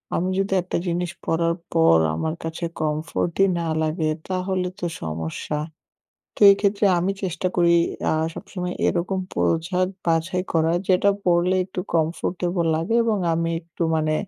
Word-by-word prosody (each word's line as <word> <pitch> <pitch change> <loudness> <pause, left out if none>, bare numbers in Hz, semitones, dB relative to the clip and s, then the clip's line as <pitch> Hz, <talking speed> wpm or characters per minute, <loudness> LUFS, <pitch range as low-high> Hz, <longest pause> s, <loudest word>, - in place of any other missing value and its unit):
আমি 185 +2 0
যদি 195 0 0
একটা 180 - -3
জিনিস 175 +1 -1
পড়ার 165 +1 +1 0.2
পর 80 0 +5 0.2
আমার 160 - -2
কাছে 165 +1 -4 0.2
কমফোর্টই 155 +4 0
না 165 - -2
লাগে, 155 0 0 0.2
তাহলে 185 0 -1
তো 175 - -3 0.2
সমস্যা। 80 - -4 0.8
তো, - - -13
এক্ষেত্রে 200 +1 +1
আমি 190 +3 0
চেষ্টা 185 0 -1
করি 170 -1 +4 0.4
আ - - +2 0.2
সবসময় 180 -3 -5
এরকম 185 +2 0
পোশাক 180 +3 +1 0.2
বাছাই 170 +2 +1
করা, 160 0 +3 0.2
যেটা 190 +2 +4 0.2
পড়লে 180 +1 +3
একটু 185 -1 -6
কমফোর্টেবল 175 +2 0
লাগে 165 +9 -1
এবং 220 -2 +1 0.2
আমি 165 0 0
একটু 170 0 -5
মানে 155 0 +1
175 Hz, 145 wpm, -23 LUFS, 160-185 Hz, 0.8 s, পর